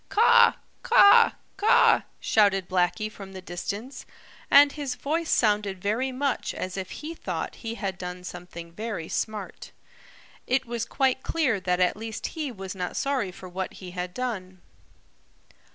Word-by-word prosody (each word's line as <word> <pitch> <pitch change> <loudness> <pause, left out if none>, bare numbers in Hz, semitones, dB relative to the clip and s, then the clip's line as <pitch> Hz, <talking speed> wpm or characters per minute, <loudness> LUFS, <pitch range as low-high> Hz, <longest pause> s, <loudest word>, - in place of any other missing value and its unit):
"Caw, 470 +2 +6 0.3
caw, 485 -4 +7 0.2
caw!" 415 +2 +5 0.2
shouted 195 -4 +2
Blacky 185 +4 +1
from 195 -2 -11
the 190 - -7
distance, 200 +8 -6 0.4
and 285 0 +7
his 280 -4 -4
voice 315 +6 -2
sounded 205 -4 +1
very 225 +8 -1
much 265 +1 -2
as 185 0 -4
if 190 -1 -5
he 310 +2 -7
thought - - -5
he 230 -1 -4
had 195 -4 -4
done 180 0 -6
something 175 -2 -9
very 210 -3 -5
smart. 215 0 -4 0.8
It 260 +1 +1
was 235 -1 -3
quite 265 -1 +1
clear 270 -11 0
that 180 -1 0
at 180 -1 +3
least 220 +1 -5
he 305 -4 -3
was 195 -4 -7
not 180 -2 -4
sorry 265 -9 -1
for 185 0 -11
what 185 +1 -5
he 185 -2 -10
had 180 0 -4
done. 190 -8 -4
210 Hz, 150 wpm, -26 LUFS, 185-265 Hz, 0.8 s, caw